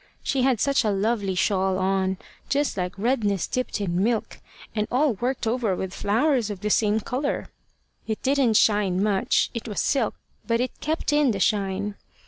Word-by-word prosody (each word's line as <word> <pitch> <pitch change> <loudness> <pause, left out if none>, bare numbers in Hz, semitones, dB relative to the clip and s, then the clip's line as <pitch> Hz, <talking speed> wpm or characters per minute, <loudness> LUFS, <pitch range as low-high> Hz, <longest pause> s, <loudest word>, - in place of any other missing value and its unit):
She 270 - 0
had 255 -3 +2
such 275 +2 +2
a 215 - +1
lovely 200 -1 0
shawl 190 0 +1
on, 190 0 0 0.3
just 285 -1 +1
like 180 0 -3
redness 205 -4 +1
dipped 255 -3 -2
in 185 -2 0
milk, 230 0 -1 0.3
and 215 -1 -1
all 270 +1 +2
worked 245 +4 -2
over 225 -4 0
with 190 0 -4
flowers 235 +3 +1
of 200 -3 -6
the 210 0 -1
same 210 0 +3
colour. 265 +6 -2 0.6
It 220 -1 -2
didn't 270 -4 +2
shine 200 -3 +3
much, 210 +3 +1
it 230 -1 -5
was 210 - -3
silk, 260 -7 +1 0.3
but 230 -1 +1
it 250 +1 -3
kept 315 0 -1
in 295 -2 +4
the 205 -4 -1
shine. 200 0 0
215 Hz, 175 wpm, -25 LUFS, 195-250 Hz, 0.6 s, in